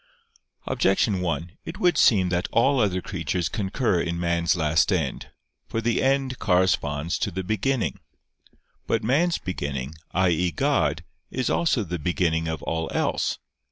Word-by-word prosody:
Objection 95 0 +1
1: 85 0 -3
It 165 - -7
would 175 -2 +3
seem 95 -9 +4
that 90 0 0
all 135 +4 +3
other 95 -5 +1
creatures 85 -1 -2
concur 100 -2 0
in 85 0 -2
man's 85 0 +1
last 80 +2 +2
end. 80 -8 -1 0.4
For 115 - -2
the 115 +1 0
end 135 -1 +1
corresponds 85 -5 +1
to - - 0
the 95 +2 -4
beginning. 110 +6 -1 0.9
But - - 0
man's 165 +9 +2
beginning 70 -6 -4 0.2
i.e. 90 -1 +2
God - - +1 0.3
is 130 0 -1
also 150 -9 +2
the 90 -2 -4
beginning 80 0 0
of 80 0 -4
all 80 0 -2
else. - - 0
90 Hz, 145 wpm, -25 LUFS, 85-115 Hz, 0.9 s, seem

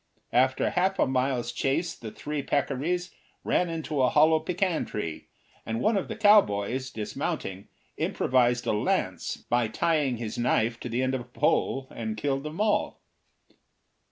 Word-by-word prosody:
After 130 +1 +3
half 190 +2 +1
a - - +4
mile's 130 -2 0
chase 165 +8 0
the 110 - -8
three 150 +6 -4
peccaries 150 +6 -1 0.3
ran 180 - +1
into 160 -3 -2
a 125 - +4
hollow 155 +1 +5
pecan 180 +1 0
tree, 85 -7 -5 0.4
and 110 0 -3
one 220 - +2
of 195 - -1
the - - -5
cowboys, 130 - +3
dismounting, 100 -3 -4 0.3
improvised 125 -1 +1
a - - +1
lance 105 - -1
by 120 -1 0
tying 145 +1 +1
his 110 -1 -5
knife 120 -1 +1
to 125 - -6
the 120 +3 0
end 130 0 0
of 130 - -1
a - - -10
pole, 130 +1 0
and 110 -2 -4
killed 135 +4 -1
them 150 +5 -7
all. 210 -1 +1
130 Hz, 155 wpm, -27 LUFS, 120-160 Hz, 0.4 s, hollow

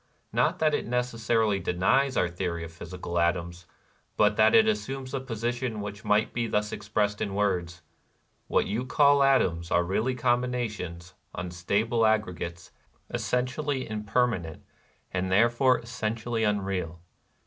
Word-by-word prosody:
Not - - +2
that 155 -1 +2
it - - -1
necessarily 115 -4 +1
denies 130 +11 +1
our 90 - +3
theory 85 -1 -3
of 80 - -8
physical 85 +1 -5
atoms, 85 0 -1 0.5
but - - +4
that 110 0 +5
it 220 0 +6
assumes 135 -11 -2
a 135 - 0
position 120 -1 -3
which 105 0 -6
might 105 +1 +2
be 120 -1 -1
thus 105 -1 -1
expressed 105 0 -1
in 100 - -2
words: 90 -4 -1 0.6
"What - - +2
you 110 +5 -2
call 140 +2 +4
atoms 90 -12 +2
are 85 - +3
really 110 +8 0
combina 125 0 +1
tions, 85 -3 -8 0.2
unstable 100 +7 -1
aggregates, 90 -6 -2 0.4
essentially 130 +2 -1
imper 110 +3 +1
manent, 85 -9 -5 0.5
and 95 0 -1
therefore 120 +6 +4
essentially 115 -1 -3
unreal. 95 -5 -1
105 Hz, 135 wpm, -27 LUFS, 90-125 Hz, 0.6 s, it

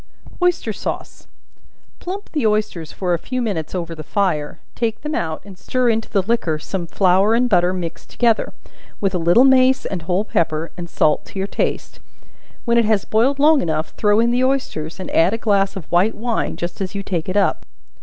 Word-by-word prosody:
Oyster 355 -11 +1
Sauce. - - -6 0.7
Plump 390 +3 -6
the 290 -8 +1
oysters 210 -7 -1
for 180 -2 -1
a 170 - 0
few 255 +8 -4
minutes 190 -9 -2
over 170 -2 -3
the 155 - -8
fire; 155 -3 -1 0.2
take 225 -2 -2
them 300 +1 -4
out 160 - -2
and 195 -2 -12
stir 255 -1 0
into 225 -1 0
the 195 - +1
liquor 195 -7 0
some 170 +2 -5
flour 190 +5 +3
and 250 +2 +3
butter 180 -5 +3
mixed 175 -3 -6
together, 230 -2 +1 0.5
with 195 -1 0
a 180 - 0
little 175 +9 +5
mace 265 0 +4
and 185 -3 -3
whole 180 +5 -1
pepper, 160 -4 -1
and 175 -1 -7
salt 150 -2 +2
to - - -11
your 195 +1 -1
taste; - - -3 0.7
when 235 -1 +3
it 230 - +3
has 210 -2 +1
boiled 245 +6 +2
long 295 0 +5
enough, 155 -1 -2
throw 210 0 +2
in 235 +1 +3
the 250 +1 +2
oysters, 230 - -1
and 185 - -6
add 175 +6 +3
a - - -3
glass 200 -3 +1
of 190 -5 -6
white 185 +6 +3
wine, 230 +1 -2
just 175 +3 -5
as 190 +1 -4
you 200 - -3
take 175 -3 -3
it 185 - -1
up. 200 - +1
200 Hz, 205 wpm, -20 LUFS, 175-235 Hz, 0.7 s, little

